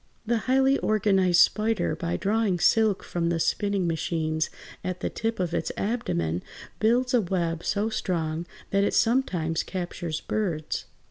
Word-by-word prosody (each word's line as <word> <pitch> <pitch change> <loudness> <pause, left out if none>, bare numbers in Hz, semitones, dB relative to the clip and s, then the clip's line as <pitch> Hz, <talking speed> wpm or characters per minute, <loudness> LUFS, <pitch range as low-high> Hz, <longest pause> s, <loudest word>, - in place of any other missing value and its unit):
The 235 +1 +1
highly 265 +1 +4
organized 195 -5 +3
spider 220 0 +2
by 170 -1 -2
drawing 210 -2 +1
silk 215 +3 +3
from 170 -1 -1
the 170 -1 0
spinning 200 +2 0
machines 160 -1 -1 0.3
at 185 -1 -4
the - - -2
tip 225 -1 -2
of 175 -2 -1
its - - -1
abdomen 85 - -1 0.4
builds 245 +3 +2
a 245 - +5
web 170 -3 -1
so 205 +2 0
strong 170 -6 -2 0.2
that 200 0 +3
it - - +1
sometimes 180 -10 +1
captures 175 -3 -4
birds. 170 -8 -2
185 Hz, 145 wpm, -26 LUFS, 170-220 Hz, 0.4 s, a